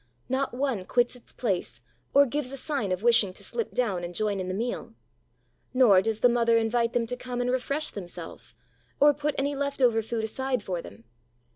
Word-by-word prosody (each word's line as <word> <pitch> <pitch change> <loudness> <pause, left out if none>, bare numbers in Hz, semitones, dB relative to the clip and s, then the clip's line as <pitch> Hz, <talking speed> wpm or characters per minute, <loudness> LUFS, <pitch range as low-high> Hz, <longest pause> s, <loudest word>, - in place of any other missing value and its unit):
Not 265 -1 -1
one 260 -7 -1
quits 245 +3 +2
its 245 - -14
place 180 - -2 0.3
or 280 +1 +6
gives 280 0 -3
a 275 - -6
sign 270 -9 -2
of 185 +3 -2
wishing 230 -5 +4
to - - -13
slip 465 - -3
down 200 -8 0
and 175 0 -6
join 205 -1 0
in 185 - -3
the 185 - -2
meal. 235 +4 -4 0.8
Nor 220 -8 +6
does 220 +1 -2
the - - +7
mother 235 -1 +3
invite 230 +1 +1
them 240 -1 +1
to 250 +2 -4
come 250 0 -5
and 245 0 +1
refresh 280 +4 -1
themselves, 180 -4 -7 0.4
or 290 +1 +7
put 295 +1 -2
any 280 +1 0
left 280 0 -2
over 235 -4 +4
food 225 0 -3
aside 255 +1 -2
for 180 -3 -3
them. 105 -4 -13
240 Hz, 205 wpm, -27 LUFS, 210-265 Hz, 0.8 s, the